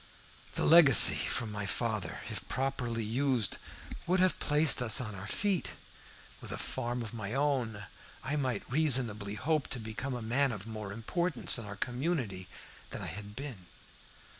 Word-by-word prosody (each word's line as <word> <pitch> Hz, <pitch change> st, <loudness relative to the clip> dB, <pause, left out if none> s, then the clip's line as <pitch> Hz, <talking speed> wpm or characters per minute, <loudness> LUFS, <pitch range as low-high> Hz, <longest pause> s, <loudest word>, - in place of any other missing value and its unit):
"The -, -, -1 dB
legacy 155 Hz, -, +9 dB
from 115 Hz, -3 st, -2 dB
my 105 Hz, -1 st, -4 dB
father, 110 Hz, -2 st, -2 dB
if -, -, -7 dB
properly 125 Hz, -3 st, -2 dB
used, 120 Hz, 0 st, 0 dB, 0.5 s
would 180 Hz, +2 st, +2 dB
have 185 Hz, -1 st, +2 dB
placed 150 Hz, -2 st, +4 dB
us 120 Hz, +1 st, +7 dB
on 110 Hz, -5 st, -4 dB
our 100 Hz, +1 st, -8 dB
feet. 195 Hz, -, -1 dB, 0.7 s
With -, -, -8 dB
a -, -, -4 dB
farm 120 Hz, -1 st, -4 dB
of 110 Hz, 0 st, -8 dB
my 110 Hz, 0 st, -5 dB
own, 130 Hz, -7 st, -1 dB, 0.4 s
I 140 Hz, +3 st, -2 dB
might 130 Hz, -7 st, -2 dB
reasonably 120 Hz, -8 st, 0 dB
hope 150 Hz, +5 st, -1 dB
to 125 Hz, -, -5 dB
become 115 Hz, +4 st, -5 dB
a 120 Hz, -, -6 dB
man 130 Hz, +4 st, +1 dB
of 105 Hz, -3 st, -7 dB
more 110 Hz, -3 st, -7 dB
importance 150 Hz, -, 0 dB
in 115 Hz, -, -7 dB
our 100 Hz, 0 st, -7 dB
community 120 Hz, -, -3 dB, 0.4 s
than -, -, -7 dB
I 80 Hz, -, -5 dB
had 105 Hz, +2 st, -9 dB
been. 120 Hz, -9 st, -8 dB
120 Hz, 165 wpm, -31 LUFS, 105-140 Hz, 0.7 s, legacy